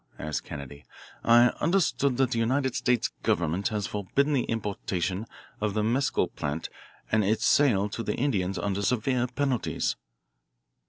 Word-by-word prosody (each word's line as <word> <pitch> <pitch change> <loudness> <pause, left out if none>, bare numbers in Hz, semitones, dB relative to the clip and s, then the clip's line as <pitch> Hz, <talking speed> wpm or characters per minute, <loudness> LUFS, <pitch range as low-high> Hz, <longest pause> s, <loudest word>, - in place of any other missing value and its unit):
asked 75 0 -4
Kennedy. 70 0 -8 0.4
"I 120 +1 +6
understood 150 -6 +1
that 130 -2 +2
the 115 - 0
United 130 +3 +1
States 125 -2 +1
government 85 +4 0
had 105 -2 -2
forbidden 120 +10 0
the 130 -4 +1
importation 100 -2 -2 0.3
of 105 -1 -1
the 105 - +1
mescal 125 +5 +1
plant 75 +2 -4 0.4
and 110 0 +3
its 105 +3 +1
sale 110 -9 +4
to 115 - -4
the - - -2
Indians 100 -9 0
under 100 -1 -1
severe 125 +3 +1
penalties." 130 -1 -1
110 Hz, 145 wpm, -27 LUFS, 100-130 Hz, 0.4 s, I